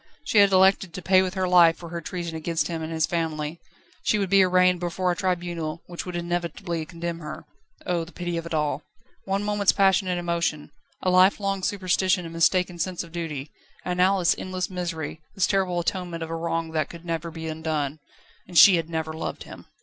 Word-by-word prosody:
She 230 -7 +3
had 200 -1 +6
elected 190 -2 +4
to 185 - -5
pay 185 0 +5
with 185 0 -2
her 185 -1 0
life 170 -2 +6
for 170 - -9
her 170 0 -5
treason 170 0 -5
against 160 +1 -1
him 165 -1 -3
and 160 +1 -5
his 160 -1 +1
family. 160 -1 -3 0.4
She 215 - +2
would 200 -2 -2
be 195 -1 +7
arraigned 180 -1 +4
before 180 +1 -1
a - - -1
tribunal 175 -3 -2
which 175 +1 -7
would 180 - -5
inevitably 170 -1 -3
condemn 170 -1 -5
her. 155 0 -8 0.4
Oh! 175 -2 0
the 165 - -11
pity 175 -1 -4
of 165 0 -4
it 170 - -6
all! 150 -2 0 0.4
One 195 +1 -1
moment's 205 -1 +3
passionate 190 -2 +3
emotion, 170 -3 -2 0.3
a 185 - +2
lifelong 195 +1 +3
superstition 185 -1 +1
and 165 - -8
mistaken 175 +1 +2
sense 180 +1 -2
of 170 - -13
duty, 155 -4 -5 0.3
and 180 0 -2
now 190 +2 +4
this 175 -3 +3
endless 185 0 -3
misery, 165 -4 -4
this 195 - +3
terrible 190 -3 +1
atonement 175 -1 -3
of 165 - -6
a - - -2
wrong 165 0 -2
that 155 -2 -1
could 170 0 -11
never 165 -1 -3
be 160 0 -7
undone. 155 -2 -2 0.5
And 175 -1 -4
she 190 0 +9
had 165 -1 -3
never 160 -1 -3
loved 160 - -5
him! - - -12
175 Hz, 205 wpm, -25 LUFS, 165-185 Hz, 0.5 s, she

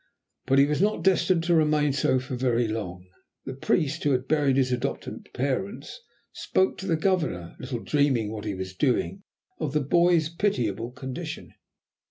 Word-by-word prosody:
But 135 +1 +3
he 140 - +7
was 150 +3 0
not 210 +2 +1
destined 180 -2 +3
to 175 +1 +2
remain 150 -3 +3
so 130 -1 +2
for 130 0 -4
very 120 -2 +1
long; 95 -5 -5 0.4
the 130 - -5
priest, 145 +2 0
who 145 -2 +3
had 130 +1 -1
buried 145 -3 +2
his 130 -2 +2
adopted 125 +2 -4
parents, 165 - -3 0.3
spoke 190 0 0
to 190 - -5
the 165 - +2
Governor, 155 - -1
little 125 -2 -5
dreaming 135 -8 +1
what 110 -1 -6
he 105 -2 -2
was 95 0 -6
doing, 145 - 0 0.4
of 145 - -2
the 150 - +3
boy's 170 +2 +3
pitiable 120 - -1
condition. 130 +1 -7
135 Hz, 170 wpm, -26 LUFS, 125-165 Hz, 0.4 s, he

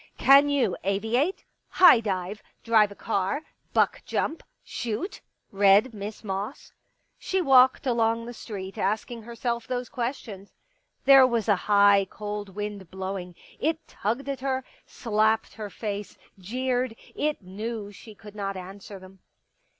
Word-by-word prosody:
" - - -36
Can 280 +1 +8
you 260 -9 +1
aviate 225 - 0 0.2
— - - -51
high 355 -10 +9
dive 200 -1 -3
— - - -43
drive 220 -3 +4
a - - -10
car 200 +9 -2
— - - -43
buck - - +2
jump 320 - -2 0.2
— - - -50
shoot? 240 - -4
" - - -48
read 200 +4 +4
Miss 210 +1 -7
Moss. 200 +4 -5 0.5
She 380 - -1
walked 260 -5 +5
along 230 -2 +1
the 240 - -7
street 195 -5 -7
asking 220 +4 -2
herself 235 +1 -4
those 250 -1 -3
questions. 235 -5 -5 0.5
There 270 -1 +8
was 235 -4 -1
a 205 - +5
high, 200 -1 +5
cold 205 -2 -6
wind 205 -3 -5
blowing; 185 -1 -5 0.2
it 320 +2 -1
tugged 235 +7 -3
at 275 -2 -3
her, 260 0 -1 0.2
slapped 220 0 0
her 210 -2 -7
face, 205 0 -5 0.2
jeered; 250 +4 -2 0.2
it 300 -7 -2
knew 205 +2 -5
she 215 +2 -13
could 210 -1 -13
not 195 -2 -4
answer 195 +2 -9
them. 190 0 -15
215 Hz, 155 wpm, -26 LUFS, 200-250 Hz, 0.5 s, high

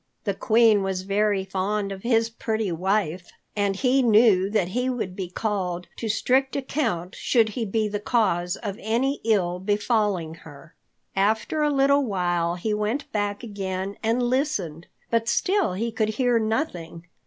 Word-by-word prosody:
The 200 - 0
Queen 220 +1 +4
was 190 -1 -2
very 200 0 +1
fond 195 +1 -2
of 190 -1 -6
his 230 0 +2
pretty 220 -3 -2
wife, 180 0 -1 0.2
and 200 -1 0
he 260 +5 +2
knew 215 -5 +5
that 205 -4 0
he 250 +6 -1
would 220 -8 -3
be 185 -2 -5
called 180 -3 -2
to 225 - -4
strict 260 +5 +1
account 245 - -2
should 230 -3 +2
he 225 +2 -3
be 215 +1 0
the 205 0 -3
cause 190 -6 +1
of 205 -3 -5
any 245 +6 0
ill 180 -6 +1
befalling 205 -4 0
her. 155 +2 -14 0.4
After 220 +10 +1
a 300 - +3
little 280 0 +3
while 175 -6 0
he 210 +5 -2
went 215 +8 -2
back 205 +1 -2
again 195 -2 -4
and 230 +2 +1
listened, 240 - -1 0.2
but 230 0 +1
still 390 - +1
he 230 +5 -2
could 220 -1 0
hear 240 +1 +2
nothing. 185 - -3
210 Hz, 160 wpm, -24 LUFS, 190-235 Hz, 0.4 s, knew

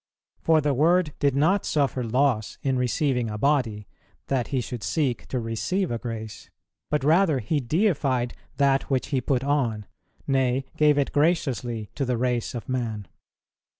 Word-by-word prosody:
For 160 -1 +3
the 145 -1 +1
Word 160 +3 +3
did 140 -2 +2
not 170 +8 +3
suffer 140 -4 0
loss 120 -2 0
in 135 -1 +1
receiving 125 -1 0
a 105 - -4
body, 115 -6 0 0.4
that 130 -3 0
He 135 - -1
should 120 -1 -5
seek 135 -1 -1
to 130 - -2
receive 115 - -1
a 115 - -2
grace, 110 -3 -7 0.4
but 150 -2 0
rather 160 0 +4
He 130 +6 -1
deified 135 - 0 0.2
that 140 -1 +2
which 130 -2 0
He 135 -3 0
put 130 +1 0
on, 125 -7 0 0.4
nay, 130 -1 +1
gave 150 -1 +4
it 140 - +1
graciously 130 - 0
to 140 - -2
the 125 -2 0
race 125 0 -1
of 120 - -6
man. 115 -6 -3
130 Hz, 160 wpm, -25 LUFS, 120-145 Hz, 0.4 s, rather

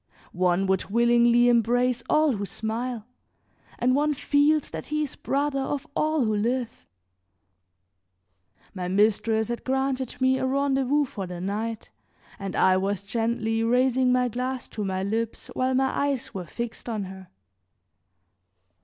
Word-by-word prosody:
One 180 +1 +2
would 190 -1 +1
willingly 235 +2 +4
embrace 245 +1 +2
all 305 -1 +4
who 200 - -3
smile, 225 +2 -4 0.7
and 255 +1 +2
one 295 +1 +1
feels 290 +2 +2
that - - -6
he 305 0 0
is 285 - -5
brother 280 0 -1
of 280 +2 -3
all 310 -4 +1
who 215 -1 +1
live. 235 +3 -2 1.9
My 185 -3 -4
mistress 220 +3 +2
had 235 - -4
granted 265 -1 -1
me 260 0 +3
a 260 - 0
rendezvous 275 +1 +1
for 195 -7 -6
the 175 -1 -7
night 210 +4 -4 0.5
and 195 -1 -5
I 185 0 +4
was 200 +1 -1
gently 225 +1 -1
raising 250 +2 +3
my 250 0 +3
glass 250 +2 -3
to 215 - -4
my 190 -1 -2
lips 225 +3 -3
while 255 0 0
my 265 0 +1
eyes 280 -3 -1
were 185 -2 -5
fixed 235 +5 -6
on 215 -3 -2
her. 190 0 -9
240 Hz, 145 wpm, -26 LUFS, 210-265 Hz, 1.9 s, willingly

